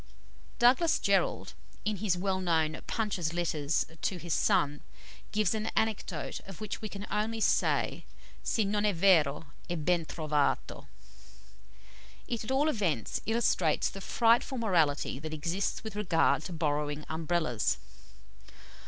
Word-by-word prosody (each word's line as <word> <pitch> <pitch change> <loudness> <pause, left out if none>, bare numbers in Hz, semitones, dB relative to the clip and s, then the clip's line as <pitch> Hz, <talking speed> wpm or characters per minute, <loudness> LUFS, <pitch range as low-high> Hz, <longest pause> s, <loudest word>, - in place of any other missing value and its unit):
Douglas 260 +7 +4
Jerrold, - - +1 0.3
in 215 -1 0
his 190 -3 0
well 190 +1 -1
known 160 -3 +1
"Punch's 190 -8 -1
Letters 160 -4 0 0.2
to 190 - -1
his 170 -2 -3
Son," 145 0 +2 0.5
gives 215 -2 +2
an 220 0 -2
anecdote 205 -7 -1
of 195 -4 -9
which 215 - -5
we 215 - -4
can 200 0 -7
only 220 +2 -1
say, - - +1 0.4
si 220 - 0
non 205 +1 0
è 205 -2 +1
vero, 165 -5 +4 0.2
è 175 - -1
ben 175 -2 +2
trovato. 150 -3 -1 1.4
It 235 -2 -3
at 220 - -7
all 270 +3 +2
events 180 - -1
illustrates 220 -8 +2
the 195 - -8
frightful 235 +5 +2
morality 165 - +1
that 155 +1 -5
exists 170 +9 -2
with 220 -2 -7
regard 175 -6 +2
to 180 - -5
borrowing 150 -2 -1
Umbrellas. 160 -7 0
180 Hz, 135 wpm, -30 LUFS, 155-215 Hz, 1.4 s, Douglas